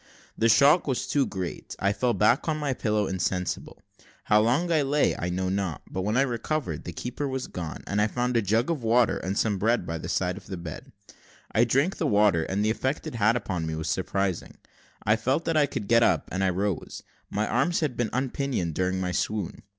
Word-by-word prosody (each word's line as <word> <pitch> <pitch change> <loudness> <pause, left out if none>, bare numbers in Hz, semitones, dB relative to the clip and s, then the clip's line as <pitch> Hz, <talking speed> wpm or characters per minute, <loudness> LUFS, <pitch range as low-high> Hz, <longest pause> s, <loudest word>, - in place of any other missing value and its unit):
The 115 - +2
shock 145 +9 +5
was 130 -3 -1
too 140 -2 +1
great 95 -3 -5
I 100 +1 +1
fell 120 +4 0
back 115 +9 +3
on 155 - 0
my 145 -3 -1
pillow 105 -4 0
insensible. 90 -1 -2 0.4
How 105 0 +4
long 130 +11 +1
I 160 -2 +4
lay, 145 +1 +2
I 90 - -3
know 95 +1 -1
not, 95 -4 -2
but 95 - -2
when 105 +5 0
I 135 - +5
recovered, 120 - -3
the 90 - -4
keeper 125 - -4
was 130 -1 -3
gone, 85 -3 -6
and 100 +1 0
I 105 - +3
found 125 +2 -1
a 115 - +4
jug 110 - +1
of 155 -6 -2
water 115 +1 +3
and 95 +2 -3
some 105 -4 +1
bread 115 -1 +1
by 85 -1 -4
the 80 - -6
side 90 +1 0
of 100 - -12
the 95 - -5
bed. 85 -2 -8 0.6
I 115 - +4
drank 140 - +1
the - - 0
water, 100 -6 +3
and 100 +2 -1
the 110 - +3
effect 130 +5 -2
it - - -5
had 115 0 +3
upon 90 -8 -2
me 80 - -3
was 80 0 -3
surprising. 95 -1 -2 0.5
I 110 - +4
felt 130 +8 0
that 165 - 0
I 150 -2 +4
could 105 - -5
get 115 +1 +5
up, - - +2
and 95 +1 -1
I 95 - +3
rose: 95 +1 -3 0.3
my 105 +1 -1
arms 175 -1 +1
had 145 -6 -1
been 120 -3 -1
unpinioned 130 - -1
during 95 +2 0
my 90 -1 -1
swoon. 105 0 -2
110 Hz, 225 wpm, -26 LUFS, 95-130 Hz, 0.6 s, shock